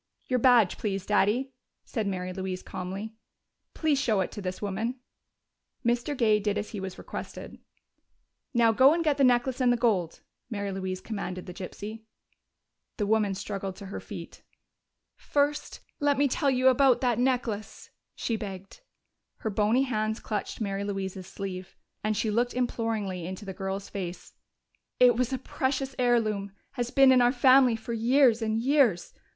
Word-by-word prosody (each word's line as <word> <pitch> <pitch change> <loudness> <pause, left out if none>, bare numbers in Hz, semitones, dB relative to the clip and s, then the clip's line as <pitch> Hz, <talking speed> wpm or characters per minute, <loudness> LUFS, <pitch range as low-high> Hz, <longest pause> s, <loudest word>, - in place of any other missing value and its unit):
"Your 255 -1 0
badge, 235 -6 +4
please, 195 -3 -2
Daddy," 215 +6 +1 0.3
said 220 -4 -2
Mary 185 -1 -3
Louise 185 -1 -4
calmly. 195 +4 -6 0.6
"Please 305 -4 +1
show 220 -7 +2
it 185 - -2
to 205 - -7
this 185 -1 -4
woman." 220 +5 -3 0.9
Mr. 240 +4 0
Gay 215 -3 +4
did 205 0 -1
as 210 0 -3
he 210 - -5
was 190 -1 -6
requested. - - -8 0.9
"Now 235 -3 +4
go 265 +7 +6
and 335 - 0
get 300 -3 +2
the 280 - +3
necklace 250 +1 +3
and 250 -1 +4
the 245 - +2
gold," 200 -9 0 0.3
Mary 200 -3 -3
Louise 190 -1 -4
commanded 185 -4 -5
the 180 - -8
gypsy. 205 +4 -7 1.0
The 210 - 0
woman 210 -2 +2
struggled 195 -1 -5
to 200 - -10
her 195 - -6
feet. - - -9 0.8
"First 290 +1 -1 0.2
let 290 -2 +2
me 285 +1 +4
tell 280 +2 +1
you 260 0 +4
about 260 0 +4
that 245 -3 +1
necklace!" 245 -5 -2 0.2
she 230 - -2
begged. 195 - -8 0.6
Her 220 - -3
bony 215 +6 +2
hands 220 -3 -1
clutched 210 -2 -4
Mary 200 -2 -2
Louise's 190 -2 -4
sleeve, 190 -1 -7 0.3
and 215 0 0
she 220 0 0
looked 240 +3 0
imploringly 220 -7 -2
into 190 +3 -7
the 190 - -5
girl's 195 +1 -4
face. 185 -3 -6 0.7
"It 245 -2 +6
was 250 +1 0
a 260 - 0
precious 265 +1 -2
heirloom 215 -5 +1 0.2
has 245 -3 -3
been 270 0 +6
in 255 -1 +6
our 245 0 +5
family 255 -1 +5
for 225 +1 -6
years 235 +1 +4
and 220 0 0
years. 245 - +2
220 Hz, 165 wpm, -28 LUFS, 195-250 Hz, 1.0 s, go